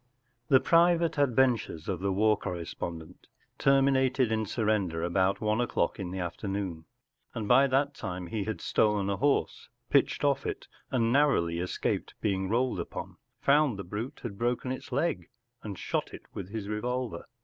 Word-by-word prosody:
V. 135 - +5
The - - +8
private 170 -1 +3
adventures 125 - +2
of 95 -3 -2
the 100 +1 0
war 105 +3 +3
corre¬ 90 -4 -5
spondent 85 +1 -7 0.3
terminated 135 -2 +3
in 110 -1 0
surrender 100 -7 0
about 95 +2 +1
one 110 +2 +1
o’clock 120 -7 0
in 95 -3 -4
the 95 - -5
afternoon, 90 -1 -4 0.5
and 110 -3 -3
by 135 +4 +6
that 140 +2 +1
time 90 -7 -5
he 100 +3 -3
had 110 -6 -4
stolen 105 -2 +1
a 100 - -1
horse, 145 +1 0 0.2
pitched - - +3
off - - +1
it, - - -5 0.2
and 115 -2 +1
narrowly 110 - +3
escaped 90 +1 -2
being 95 -2 -1
rolled 125 +3 +1
upon; - - -6 0.2
found 140 -5 +3
the 100 - -5
brute 105 +8 -6
had 100 -5 -6
broken 120 +2 0
its 130 - -6
leg, 150 +5 -1 0.3
and 100 -3 -6
shot - - -3
it - - -12
with 95 -2 -6
his 105 -1 -5
revolver. 120 +3 -3
110 Hz, 170 wpm, -29 LUFS, 95-130 Hz, 0.5 s, The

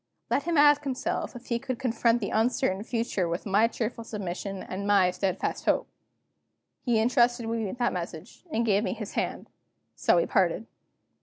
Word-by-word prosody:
Let 280 - +1
him 340 -2 +1
ask 290 0 +6
himself 270 -1 -2
if 245 0 -10
he 235 -1 -1
could 255 0 -4
confront 235 -1 +1
the 200 - -2
uncertain 220 -3 +1
future 225 -5 -1
with 170 +2 -3
my 210 +3 +4
cheerful 230 0 -4
submission 195 -3 -5
and 200 +2 -5
my 195 -3 +4
steadfast 190 0 -2
hope." - - +2 1.0
He 240 -3 +2
intrusted 240 +1 +3
me 225 -2 -1
with 195 - -6
that 240 -1 +1
message, 175 +2 -7
and 230 -2 +1
gave 205 -1 +3
me - - -1
his 215 -3 -6
hand. - - -2 0.5
So - - +3
we - - +3
parted. - - +1
230 Hz, 175 wpm, -27 LUFS, 200-245 Hz, 1.0 s, ask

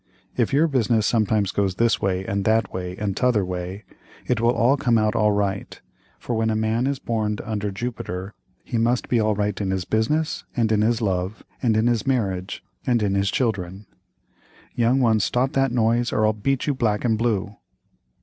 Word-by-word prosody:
If - - +1
your 150 +4 +4
business 115 -6 +1
sometimes 110 -3 +1
goes 100 -2 0
this 115 +2 +2
way, 95 -1 -1
and 100 0 -1
that 110 +2 +1
way, 90 0 -5
and 100 -3 -2
t'other 120 -6 +2
way, 90 +2 -5 0.4
it 120 -3 0
will 115 - +3
all 120 +3 +3
come 120 -4 +2
out 110 -1 +2
right, 100 -2 0 0.4
for 120 - -4
when 110 0 +1
a 110 - 0
man 110 +3 0
is 140 0 -1
borned 110 -4 -2
under 105 -2 -3
Jupiter 100 -3 -5 0.3
he 120 - -2
must 120 +2 +1
be 120 - +3
all 110 -1 +1
right 105 0 -1
in 95 - -1
his 95 -1 -1
business, 150 +9 0
and 115 -2 +2
in 105 -1 +3
his 115 +1 +1
love, 95 +1 -2 0.2
and 115 -4 +2
in 110 - +2
his 120 -2 +1
marriage, 95 -8 -1 0.2
and 120 -3 +1
in 100 -1 +1
his 100 0 +1
children. 100 -5 -2 0.9
Young 120 +3 +2
ones 110 -4 +3
stop 125 +4 +1
that 135 -2 +2
noise 120 0 +1
or 110 - +2
I'll 110 - +3
beat 125 +5 -1
you 145 - +1
black 115 -4 0
and 115 -2 +3
blue. 105 -3 -1
110 Hz, 195 wpm, -23 LUFS, 100-120 Hz, 0.9 s, your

